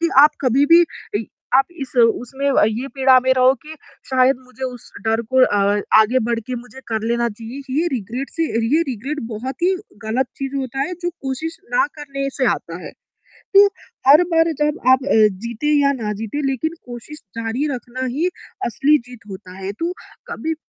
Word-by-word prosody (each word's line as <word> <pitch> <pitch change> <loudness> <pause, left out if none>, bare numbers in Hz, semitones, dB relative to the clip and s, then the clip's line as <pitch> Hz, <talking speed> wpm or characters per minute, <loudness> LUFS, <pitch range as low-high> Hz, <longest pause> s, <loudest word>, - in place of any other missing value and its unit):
कि 335 - +2
आप 295 +2 +9
कभी 270 +2 +3
भी 340 +2 +7 0.3
इ 220 - -4 0.3
आप 270 +1 +6 0.2
इस 270 - -5
उसमें 245 +3 +2
ये 235 -1 +2
पीड़ा 265 -1 +5
में 260 - +2
रहो 255 0 +6
कि 310 +1 -10 0.4
शायद 260 +1 +4
मुझे 260 +1 -7
उस 250 -2 -7 0.2
डर 225 +1 +2
को 260 0 +6
आ - - +3 0.4
आगे 225 +4 +3
बढ़ 235 -1 0
के 255 - -3
मुझे 245 +2 -10
कर 220 -1 -2
लेना 235 0 +1
चाहिए, 230 +5 -8
ये 310 +6 +1
रिग्रेट 245 +3 -4
से 330 - -2 0.3
ये 320 - +4
रिग्रेट 265 +5 -4
बहुत 240 +4 -5
ही 370 +2 +3 0.3
ग़लत 245 +4 0
चीज़ 275 0 -4
होता 270 -1 -3
है 330 +6 -1
जो 350 - 0
कोशिश 320 0 -5 0.2
ना 250 - +4
करने 275 -2 -4
से 260 - +2
आता 170 +1 -8
है, - - -7 0.6
तो 400 +1 +9 0.4
हर 300 +5 +8
बार 325 0 +4
जब 300 +2 +1
अ, - - +6
आप 260 - +6 0.4
जीतें 235 +5 -3
या 280 - +4
ना 210 -1 -1
जीतें 255 +7 -3
लेक़िन 275 +5 -1 0.2
कोशिश 240 +6 -9 0.2
जारी 230 +6 -1
रखना 255 +1 -5
ही 335 +5 +1 0.4
असली 290 +6 +3
जीत 240 -4 -13
होता 185 -1 -10
है, 195 +1 -4
तो 335 - -3 0.4
कभी 320 0 -3
260 Hz, 190 wpm, -20 LUFS, 235-290 Hz, 0.6 s, आप